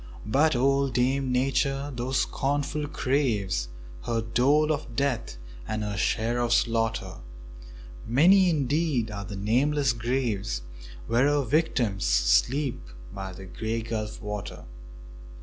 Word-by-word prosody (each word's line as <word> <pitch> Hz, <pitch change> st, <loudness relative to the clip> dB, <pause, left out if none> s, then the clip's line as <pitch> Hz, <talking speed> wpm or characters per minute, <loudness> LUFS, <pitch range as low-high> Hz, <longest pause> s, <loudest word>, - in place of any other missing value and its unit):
But 140 Hz, +7 st, +3 dB
old 135 Hz, +1 st, +2 dB
Dame 130 Hz, +2 st, +1 dB
Nature, 135 Hz, +2 st, 0 dB
though 120 Hz, +1 st, -3 dB
scornful, 145 Hz, +2 st, -1 dB
craves 120 Hz, -, 0 dB, 0.4 s
Her 115 Hz, -1 st, 0 dB
dole 135 Hz, +7 st, +2 dB
of 145 Hz, -6 st, -4 dB
death 125 Hz, -, -1 dB, 0.3 s
and 110 Hz, 0 st, -2 dB
her 105 Hz, -1 st, -3 dB
share 115 Hz, +5 st, 0 dB
of 120 Hz, -1 st, +1 dB
slaughter; 115 Hz, -1 st, 0 dB, 0.9 s
Many 180 Hz, -, +5 dB
indeed 145 Hz, -5 st, 0 dB
are 100 Hz, -1 st, -5 dB
the 100 Hz, -, -7 dB
nameless 130 Hz, +7 st, +1 dB
graves 115 Hz, -, -2 dB, 0.4 s
Where 120 Hz, -, +2 dB
her 145 Hz, -1 st, +2 dB
victims 125 Hz, -7 st, 0 dB
sleep -, -, +2 dB, 0.3 s
by 95 Hz, -1 st, -6 dB
the 95 Hz, +1 st, -10 dB
Grey 110 Hz, +5 st, -3 dB
Gulf 110 Hz, -2 st, -4 dB
water. 105 Hz, -7 st, -6 dB
120 Hz, 120 wpm, -26 LUFS, 110-140 Hz, 0.9 s, Many